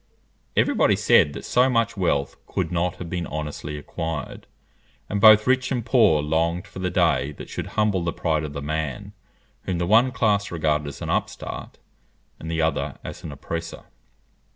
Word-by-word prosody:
Every - - +3
body - - +3
said 75 - +4
that - - -8
so 125 +2 +3
much 115 -2 +1
wealth 85 -7 0
could - - -2
not 90 +1 0
have 90 -1 -7
been 85 0 -3
honestly 75 -1 -5
acquired; 80 -1 -5 0.6
and 100 0 -2
both 110 -1 +8
rich 130 +1 +2
and 120 -4 -1
poor 115 - +4
longed 85 +3 0
for - - -10
the 90 0 -1
day 75 -3 +1
that - - -10
should - - -4
humble 105 -4 +2
the 85 - -1
pride 80 -2 -1
of 75 -2 -5
the 70 -1 -5
man, 75 -3 -3 0.5
whom 90 -2 -1
the 85 - 0
one 115 +7 +4
class 105 -4 +1
regarded 75 -3 0
as 70 - -7
an - - -2
upstart - - -4 0.6
and 80 - -7
the 80 0 0
other 80 - -1
as - - -8
an 80 - -6
oppressor. 80 +4 -6
85 Hz, 180 wpm, -24 LUFS, 75-105 Hz, 0.6 s, both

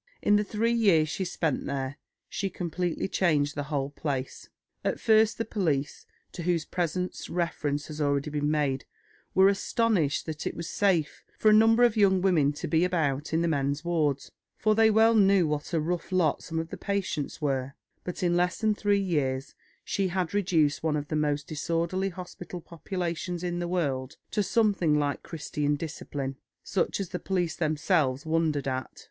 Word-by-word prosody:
In 205 - +4
the 210 - +3
three 225 +3 0
years 190 -10 +4
she 190 - -2
spent 165 -5 -2
there, 140 +1 -3 0.3
she 195 - -3
completely 175 0 -2
changed 150 -7 +1
the 145 -1 -4
whole 140 -2 -2
place. 140 -3 -4 0.3
At - - -1
first 220 0 +4
the 230 - -2
police, 155 -10 -2 0.2
to 175 - -7
whose 170 -2 0
presence 180 +1 -3
reference 150 -4 -1
has 155 0 -6
already 140 0 0
been 150 0 0
made, 145 -3 0 0.5
were 190 +1 +7
astonished 200 - +1
that 155 -1 -4
it - - -4
was 170 0 -5
safe 175 -5 0
for 215 - +4
a - - +6
number 225 +2 +6
of 240 -2 +4
young 195 -3 +4
women 170 -7 +3
to 145 - -5
be 165 0 +2
about 155 -5 0
in 160 +1 +1
the - - +2
men's 145 0 -1
wards, 150 -5 0 0.3
for 215 - +2
they 220 +1 +5
well 220 +1 +5
knew 195 -4 +5
what 150 -1 -3
a 165 - +1
rough 170 +3 -2
lot 180 -5 +2
some 165 - -5
of 160 0 -2
the - - -7
patients 195 -8 -2
were; 135 -2 -1 0.3
but 180 +1 -5
"in 175 -1 +2
less 180 +1 +1
than 220 -1 +2
three 205 -1 +1
years 145 -8 -1 0.3
she 195 -1 0
had 180 -1 -2
reduced 165 -7 +2
one 155 -1 0
of 145 -1 -3
the 155 - -1
most 145 -1 0
disorderly 170 +5 -1
hospital 180 -1 -8
populations 175 +1 -4
in 175 -1 -2
the 175 - -2
world 140 -7 -2
to 210 - +1
something 195 -8 +2
like 145 -1 -1
Christian 150 -2 -2
discipline, 140 -3 -5 0.3
such 195 - -1
as 195 -3 -3
the 180 - -4
police 180 -3 -1
themselves 150 -3 +1
wondered 160 -3 0
at. 130 -2 -4
165 Hz, 180 wpm, -28 LUFS, 145-190 Hz, 0.5 s, were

